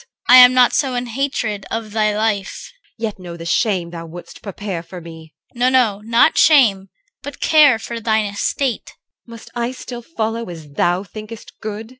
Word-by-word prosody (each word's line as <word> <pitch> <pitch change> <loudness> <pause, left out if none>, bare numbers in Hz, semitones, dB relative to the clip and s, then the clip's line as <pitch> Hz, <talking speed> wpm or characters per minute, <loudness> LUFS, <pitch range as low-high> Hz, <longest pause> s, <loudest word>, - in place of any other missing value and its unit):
CHR. - - +3
I - - +11
am 250 0 +8
not 250 -1 +5
so 265 -3 0
in 245 0 -2
hatred 235 -5 -3
of 225 -2 -4
thy 215 -1 0
life. 210 -3 -3 0.3
EL. - - -10
Yet 215 -3 -3
know 175 -2 -9
the 165 - -9
shame 180 -1 0
thou 165 -1 -8
wouldst 175 +2 -12
prepare 200 -3 -6
for 180 +2 -10
me. 160 -2 -13 0.2
CHR. 240 - -14
No, 250 +1 +3
no! 235 -6 +2
Not 230 +7 +3
shame, 215 -11 +4 0.3
but 285 - -9
care 300 -6 +5
for 230 +1 -6
thine 220 -1 +1
estate. 225 +5 -3 0.3
EL. - - -14
Must 230 - -13
I 240 0 -2
still 250 -1 -8
follow 230 - -4
as 160 -4 -10
thou 175 +5 0
thinkest 215 +2 -10
good? 215 +1 -6
220 Hz, 195 wpm, -19 LUFS, 190-245 Hz, 0.3 s, I